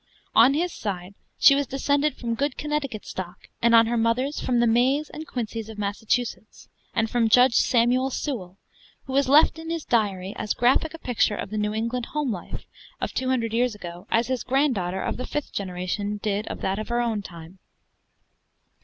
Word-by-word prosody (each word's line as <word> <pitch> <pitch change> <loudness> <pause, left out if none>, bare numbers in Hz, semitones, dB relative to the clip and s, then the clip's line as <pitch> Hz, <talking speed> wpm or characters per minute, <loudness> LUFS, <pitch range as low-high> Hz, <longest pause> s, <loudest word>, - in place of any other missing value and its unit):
On 250 +5 +6
his 350 +3 0
side, 190 -2 -5 0.2
she 275 - +7
was 280 -1 0
descended 285 +3 +1
from 235 -1 -3
good 280 +3 -1
Connecticut 295 -7 -3
stock; 180 -1 -7
and 235 0 +5
on 230 0 +7
her 235 +1 -1
mother's, 240 +6 0
from 245 -2 0
the 240 - +4
Mays 255 +6 +2
and 315 0 -8
Quincys 225 -2 -4
of 220 - -9
Massachusetts, 215 +2 -3 0.3
and 225 - +2
from 230 0 +1
Judge 250 +2 +6
Samuel 250 +2 +3
Sewall, 210 - -4 0.5
who 265 - -6
has 275 -1 +2
left 305 +3 +5
in 325 0 -7
his 330 -2 -3
diary 200 -5 0
as 210 - -2
graphic 265 +6 +2
a - - -8
picture 245 -7 0
of 200 - -6
the 215 - -3
New 210 0 -1
England 235 +2 -2
home 300 -4 -2
life 180 -5 -7 0.3
of - - -3
two 260 0 -1
hundred 230 -4 0
years 240 -1 +1
ago, 175 0 -9
as 230 +1 +2
his 255 0 -2
granddaughter 245 -9 0
of - - -2
the 255 - -5
fifth 295 -1 -4
generation 195 +2 -3
did 205 0 -2
of - - -6
that 190 +2 -1
of 215 - -5
her 240 0 0
own 230 -3 0
time. 170 0 -11
235 Hz, 195 wpm, -25 LUFS, 210-265 Hz, 0.5 s, she